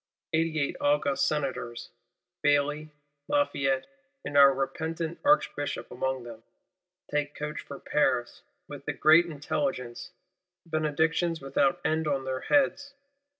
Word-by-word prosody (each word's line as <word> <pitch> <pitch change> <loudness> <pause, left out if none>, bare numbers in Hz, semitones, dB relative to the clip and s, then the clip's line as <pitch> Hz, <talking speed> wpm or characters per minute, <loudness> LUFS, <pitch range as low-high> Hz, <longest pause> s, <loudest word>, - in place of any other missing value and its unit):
Eighty 160 0 +1
eight 140 - -1
august 145 -1 +2
Senators, 135 -5 -3 0.5
Bailly, 150 +1 +1 0.4
Lafayette, 135 - +1 0.4
and 145 - -5
our 140 -1 +8
repentant 160 +5 -3
Archbishop 290 - +1
among 130 +1 -2
them, 115 -2 -10 0.7
take 150 0 -1
coach 150 0 -5
for 140 - -9
Paris, 125 -5 0 0.3
with - - -9
the - - -2
great 165 +3 +5
intelligence; 145 -5 -3 0.6
benedictions 160 +1 0
without 140 +6 +1
end 160 0 +1
on 135 -2 -1
their 130 0 -3
heads. 285 0 +1
150 Hz, 115 wpm, -28 LUFS, 135-160 Hz, 0.7 s, our